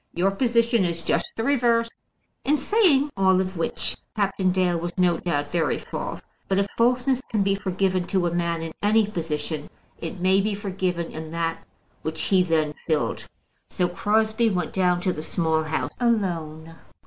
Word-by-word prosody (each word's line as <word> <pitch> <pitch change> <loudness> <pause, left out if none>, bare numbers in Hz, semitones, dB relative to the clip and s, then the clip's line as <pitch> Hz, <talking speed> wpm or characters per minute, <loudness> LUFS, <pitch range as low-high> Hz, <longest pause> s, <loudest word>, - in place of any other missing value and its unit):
Your 185 +3 +2
position 235 0 +2
is 170 -2 -2
just - - 0
the 225 - -1
reverse." 235 -3 +3 0.6
In 300 +2 +3
saying 295 - +3
all 190 -1 +4
which 185 -3 -1 0.2
Captain 195 -3 +1
Dale 180 -2 +1
was 175 +2 -5
no 180 -2 +3
doubt 145 -4 -2
very 170 -2 +1
false; - - -6 0.2
but 190 - +1
if 200 - +3
falseness 250 +2 +2
can 210 -3 +1
be 195 0 +2
forgiven 190 -2 0
to 185 -2 +1
a 170 - 0
man 170 -1 -1
in 165 - -5
any 215 +1 +4
position, 155 -5 -4 0.3
it 165 +2 -6
may 190 +2 +4
be 210 0 -1
forgiven 185 -4 -2
in 155 0 -7
that 165 -1 -2 0.4
which 160 0 -4
he 190 -2 +3
then 160 -4 +1
filled. 155 -3 -1 0.4
So 180 - 0
Crosbie 220 +5 +1
went 180 -5 -2
down 180 -2 +2
to 185 0 0
the 155 - -5
Small 160 0 0
House 155 0 -3
alone. 165 -9 -1
185 Hz, 170 wpm, -24 LUFS, 165-215 Hz, 0.6 s, all